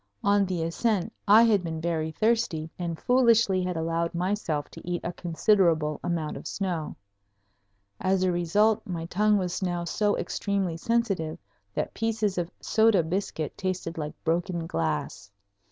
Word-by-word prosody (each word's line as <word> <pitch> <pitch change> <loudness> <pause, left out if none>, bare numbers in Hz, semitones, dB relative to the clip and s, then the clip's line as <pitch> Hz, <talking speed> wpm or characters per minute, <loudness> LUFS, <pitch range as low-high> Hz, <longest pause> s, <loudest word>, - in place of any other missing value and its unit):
On 200 -1 +3
the 180 -3 -1
ascent 205 +4 0
I 215 +3 +8
had 210 -5 +3
been 160 -1 -4
very 160 -1 -1
thirsty 195 -5 0
and 170 -2 -3
foolishly 230 -6 +3
had 180 -2 -2
allowed 165 +1 -1
myself 175 -5 -1
to - - -10
eat 175 0 -3
a 175 - -3
considerable 165 -3 +2
amount 165 -3 -2
of - - -8
snow. 175 -6 -3 1.0
As 185 0 +1
a 185 - +2
result 205 +6 +2
my 170 -3 -4
tongue 210 +4 +2
was 180 -1 -2
now 175 -2 -1
so 205 +5 0
extremely 195 -4 -1
sensitive 195 -5 -1 0.4
that - - -2
pieces 220 -4 -1
of 170 -1 -2
soda 220 -5 +3
biscuit 165 -3 -3
tasted 185 -3 -3
like 150 -1 -4
broken 170 +1 -1
glass. 80 - -3
180 Hz, 150 wpm, -27 LUFS, 165-205 Hz, 1.0 s, I